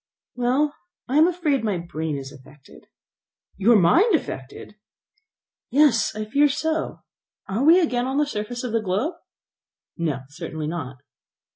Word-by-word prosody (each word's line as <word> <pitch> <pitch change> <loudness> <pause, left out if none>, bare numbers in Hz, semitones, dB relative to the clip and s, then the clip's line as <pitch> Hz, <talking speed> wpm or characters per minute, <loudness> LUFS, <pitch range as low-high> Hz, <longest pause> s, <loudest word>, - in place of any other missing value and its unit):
"Well, 260 +5 +1 0.3
I 265 +4 0
am 320 - +6
afraid 320 -8 0
my 210 -4 0
brain 160 -3 -4
is 135 0 -7
affected." 145 0 -17 0.7
"Your 220 +5 +5
mind 335 - +5
affected!" 135 - -6 1.0
"Yes, 265 -7 +3
I 215 0 -3
fear 285 +7 +3
so. 320 +3 -2 0.5
Are 200 +7 -1
we 330 +5 +7
again 250 -7 0
on 265 +1 -2
the 295 - +3
surface 240 -1 -5
of 250 - -3
the 230 0 +1
globe?" 210 - -1 0.8
"No, 155 -6 -2
certainly 155 +1 -6
not." 145 -6 -6
230 Hz, 140 wpm, -23 LUFS, -, 1.0 s, we